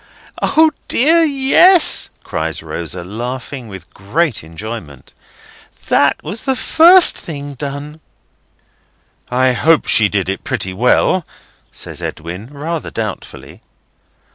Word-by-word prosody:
O 315 0 +3 0.2
dear 325 +7 +4
yes!" 310 +5 +4
cries 80 -1 -4
Rosa, 85 +2 -4
laughing 120 +5 -6
with 95 -4 -12
great 135 - -2
enjoyment. 80 - -9 0.8
"That - - +2
was 220 - -5
the 265 -1 0
first 340 +6 +5
thing 145 -3 -7
done." 145 +3 -7 1.3
"I 130 +1 +2
hope 155 +6 +2
she 110 -2 +3
did 95 -2 -2
it 95 -1 -4
pretty 95 - -3
well," 125 - +2 0.5
says - - -7
Edwin 85 +7 -7
rather 150 +4 -5
doubtfully. 110 -3 -7
130 Hz, 110 wpm, -16 LUFS, -, 1.3 s, first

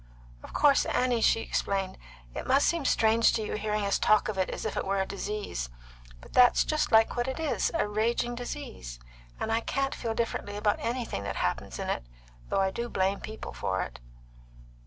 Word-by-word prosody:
Of - - -11
course, 285 -2 +4
Annie," 250 -2 +1
she 225 - +4
explained, 195 -3 -2 0.3
"it - - -5
must 275 +2 +4
seem 335 -4 0
strange 225 +1 +4
to 220 - 0
you - - -4
hearing 210 -1 -1
us 200 - +1
talk 215 0 +4
of 210 - -3
it 185 - +1
as - - -5
if - - -2
it - - -1
were 195 0 0
a 190 - +1
disease; 200 - -4 0.5
but - - -15
that's 250 -1 +6
just 305 0 0
like 225 0 +5
what 240 +1 0
it 265 +4 -3
is 315 -3 0
a 330 - +1
raging 230 +3 0
disease; 240 - -6 0.4
and 220 - -2
I 225 - +3
can't 275 +3 -1
feel 225 -2 -3
differently 225 -3 -2
about 210 0 +1
anything 235 - -2
that 100 - -3
happens 90 - -2
in - - -4
it, - - -1 0.5
though - - +2
I 190 0 +1
do 235 +4 -4
blame 190 0 0
people 220 0 -7
for 95 0 -1
it." - - -9
220 Hz, 200 wpm, -29 LUFS, 195-240 Hz, 0.5 s, that's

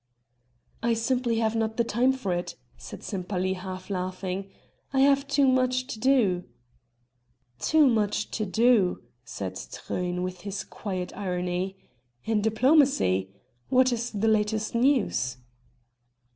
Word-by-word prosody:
"I 230 0 +2
simply 240 +1 0
have 225 0 +1
not 220 0 -1
the 235 - +3
time 240 +3 +2
for 230 -9 -2
it," 175 0 -3 0.2
said - - -10
Sempaly 185 -1 -2
half 185 0 -7
laughing. 185 +1 -3 0.4
"I 265 0 +2
have 275 0 +4
too 285 -1 +3
much 255 0 +2
to 240 -5 -7
do." 220 -9 +3 1.2
"Too 310 -1 +4
much 215 -4 +1
to 215 - -2
do!" 220 -2 +3 0.2
said 95 -6 -5
Truyn 180 - -4
with 180 -1 -5
his 200 0 -4
quiet 185 -3 -5
irony.... 180 0 -2 0.5
"In 220 -2 +1
diplomacy? 220 - +3 0.4
What 255 0 +4
is 235 0 -2
the 215 +1 -1
latest 215 0 +1
news?" 235 - +1
215 Hz, 130 wpm, -27 LUFS, 185-250 Hz, 1.2 s, have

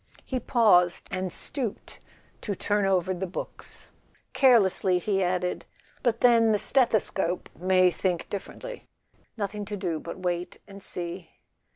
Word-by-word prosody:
He 260 - -2
paused, 205 -8 +3
and 185 0 -2
stooped 240 - -4 0.4
to 205 - -3
turn 205 +2 0
over 185 -1 +1
the 185 +1 -4
books. 175 - -9 0.4
Care¬ 255 -4 +6
lessly, 190 -2 +2
he 195 +1 0
added: 180 0 -1 0.4
"But 235 -2 0
then 230 -2 +5
the - - +3
stethoscope 210 -7 0
may 185 +1 +3
think 180 -1 -2
differently. 485 - -7 0.5
Nothing 205 0 -3
to 205 0 -5
do 175 -4 -2
but 170 - -7
wait 180 -1 -3
and 200 0 -11
see." 175 -1 -4
190 Hz, 140 wpm, -27 LUFS, 180-215 Hz, 0.5 s, Care¬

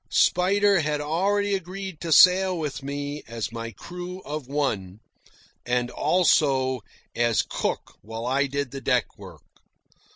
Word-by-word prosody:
Spider 200 +2 +3
had 150 -1 -1
already 200 +7 0
agreed 190 -1 -5
to 165 - -4
sail 185 +3 +6
with 150 -4 -4
me 145 +1 -4
as 115 -2 -4
my 115 0 -5
crew 180 +6 -8
of 150 -4 -6
one, 110 -10 -2 0.6
and, 125 0 -1
also, 135 -8 +2 0.3
as 120 -1 +2
cook - - -4
while 115 +2 -7
I 135 +3 +1
did 140 -1 -3
the 135 - -7
deck 125 -4 0
work. - - -12
145 Hz, 135 wpm, -25 LUFS, 125-180 Hz, 0.6 s, sail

